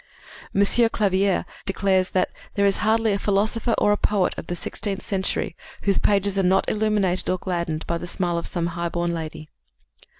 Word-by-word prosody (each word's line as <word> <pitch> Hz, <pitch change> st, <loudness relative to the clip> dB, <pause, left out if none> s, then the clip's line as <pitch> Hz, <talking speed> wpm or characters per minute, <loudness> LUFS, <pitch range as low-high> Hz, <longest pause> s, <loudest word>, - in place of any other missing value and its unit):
M. 200 Hz, -, +4 dB
Clavière 200 Hz, -3 st, +3 dB, 0.2 s
declares 195 Hz, -1 st, +1 dB
that 185 Hz, -, 0 dB, 0.2 s
"There 200 Hz, -, +2 dB
is 200 Hz, -1 st, +3 dB
hardly 220 Hz, 0 st, +2 dB
a 200 Hz, -, -1 dB
philosopher 215 Hz, +3 st, +1 dB
or 205 Hz, -, +3 dB
a 205 Hz, -, +3 dB
poet 205 Hz, -3 st, +1 dB
of -, -, -7 dB
the 175 Hz, -, -3 dB
sixteenth 195 Hz, +3 st, -3 dB
century 190 Hz, -4 st, -1 dB, 0.3 s
whose 200 Hz, -1 st, +3 dB
pages 200 Hz, -1 st, +2 dB
are -, -, +4 dB
not 190 Hz, +1 st, +2 dB
illuminated 210 Hz, -4 st, +1 dB
or 185 Hz, -, +1 dB
gladdened 170 Hz, -4 st, -3 dB
by 170 Hz, 0 st, -2 dB
the 175 Hz, -, -6 dB
smile 175 Hz, -1 st, 0 dB
of -, -, -5 dB
some 170 Hz, -2 st, -2 dB
high 170 Hz, 0 st, -2 dB
born 170 Hz, 0 st, -1 dB
lady." 155 Hz, -2 st, -6 dB
195 Hz, 180 wpm, -23 LUFS, 175-205 Hz, 0.3 s, M